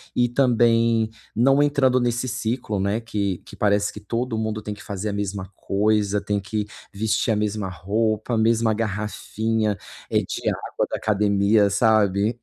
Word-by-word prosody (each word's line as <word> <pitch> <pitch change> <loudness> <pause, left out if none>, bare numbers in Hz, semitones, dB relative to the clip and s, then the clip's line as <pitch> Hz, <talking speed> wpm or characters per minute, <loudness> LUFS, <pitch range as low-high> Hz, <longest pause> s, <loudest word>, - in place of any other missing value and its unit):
e 120 0 +3
também 115 -3 +3 0.3
não 135 +5 +4
entrando 135 -3 +3
nesse 120 +1 0
ciclo, 115 -3 -2
né, 100 +3 0
que 100 -5 -2
que - - -14
parece 100 -1 +2
que 105 - -9
todo 115 +3 -3
mundo 110 -1 -2
tem 105 - -6
que 105 - -13
fazer 100 +1 -4
a - - -3
mesma 100 -1 -4
coisa. 105 0 +1
Tem 105 0 -1
que 105 +1 -3 0.3
vestir 110 +3 0
a 110 - +2
mesma 105 -1 -1
roupa, 110 +6 -1
a - - +1
mesma 115 0 +3
garrafinha, 110 0 -1 0.4
eh, - - +4
de - - -4
água - - -1
da - - -3
academia, 100 0 +2
sabe? 105 +1 +2
110 Hz, 165 wpm, -23 LUFS, 100-115 Hz, 0.4 s, não